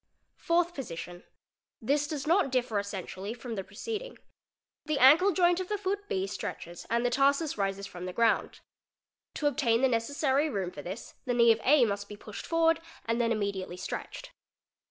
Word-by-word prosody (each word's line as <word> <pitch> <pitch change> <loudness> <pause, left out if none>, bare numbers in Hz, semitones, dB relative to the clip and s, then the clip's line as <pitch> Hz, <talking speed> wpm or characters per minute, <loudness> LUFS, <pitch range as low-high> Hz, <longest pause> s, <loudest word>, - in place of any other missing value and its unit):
Fourth 345 +1 +1
Position—This 230 - -5
does 300 -2 -4
not 335 -3 +3
differ 245 -5 +1
essentially 200 +1 -5
from 245 -1 -7
the 195 -3 -3
preceding. 440 - -6 0.7
'The 305 -2 0
ankle 310 +10 +7
joint 350 0 +3
of 370 - -3
the 420 - 0
foot 405 +1 -3
B 190 0 0
stretches 175 -3 -6
and 235 +1 +1
the 245 - +2
tarsus 280 +4 +2
rises 195 -1 -2
from 180 -2 -7
the - - -4
ground. 230 +2 +1 0.7
'To 300 - -3
obtain 250 -5 +2
the - - +6
necessary 270 +5 +1
room 195 -7 -2
for 145 - -8
this 190 +8 -7
the 245 - 0
knee 235 -1 +6
of 225 0 +1
A 270 -2 +5
must 200 -1 -3
be 210 - -8
pushed 210 0 -9
forward 330 0 +3 0.3
and 230 +1 0
then 230 -1 +1
immediately 200 -4 -2
stretched. - - -6
240 Hz, 175 wpm, -29 LUFS, 200-310 Hz, 0.7 s, ankle